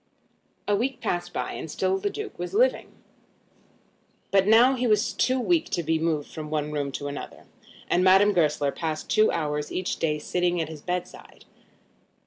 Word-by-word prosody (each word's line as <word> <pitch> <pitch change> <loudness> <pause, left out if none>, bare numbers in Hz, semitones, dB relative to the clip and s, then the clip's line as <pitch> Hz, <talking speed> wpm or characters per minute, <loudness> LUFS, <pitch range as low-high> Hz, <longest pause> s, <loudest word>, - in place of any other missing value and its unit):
A 205 - +3
week 250 +6 -2
passed 175 - -2
by, - - -3
and - - -6
still 385 - 0
the 405 +1 -1
Duke 425 +1 -7
was - - -5
living. - - +2 1.4
But 195 0 +3
now 235 +5 +6
he 250 -1 -1
was 215 +1 +2
too 255 +1 +1
weak 325 +5 +1
to 170 - -1
be 160 +1 0
moved 155 -3 -1
from 155 -1 -6
one 150 -1 -2
room 145 -2 -2
to 145 - -4
another, 145 0 -8 0.4
and 180 - +2
Madame 195 +2 +5
Goesler 150 -5 +1
passed 160 -1 -4
two 215 0 +4
hours 150 -2 -2
each 185 - -2
day 150 -2 0
sitting 175 +3 -1
by 165 - 0
his 155 -1 -9
bedside. 180 +1 -6
180 Hz, 175 wpm, -25 LUFS, 155-225 Hz, 1.4 s, now